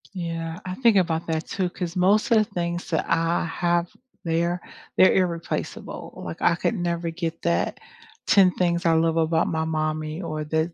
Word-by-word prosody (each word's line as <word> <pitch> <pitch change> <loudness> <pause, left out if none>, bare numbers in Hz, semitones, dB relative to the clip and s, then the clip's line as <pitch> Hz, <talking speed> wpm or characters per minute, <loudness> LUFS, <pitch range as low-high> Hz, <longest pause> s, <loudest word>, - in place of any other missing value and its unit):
Yeah, 165 -2 -4
I 185 0 -4
think 230 -4 +4
about 165 -3 +1
that 160 -1 -2
too, 185 -2 -1
'cause 175 -1 -5
most 195 +6 +3
of 230 - +6
the 215 - +5
things 175 -3 -4
that 160 - 0
I 165 +1 +1
have 170 +1 0 0.4
there, 170 +2 0 0.4
they're 185 - +7
irreplaceable, 170 -3 -3
like, 85 - -7
I 170 - +4
could 200 - -1
never 170 -2 -2
get 165 -1 -4
that 85 +1 0 0.5
10 190 -2 +6
things 175 0 0
I 165 - +4
love 160 0 +2
about 160 0 +2
my 160 0 -1
mommy 155 0 -2
or 155 -3 -3
the 160 +2 -1
170 Hz, 180 wpm, -24 LUFS, 160-180 Hz, 0.5 s, they're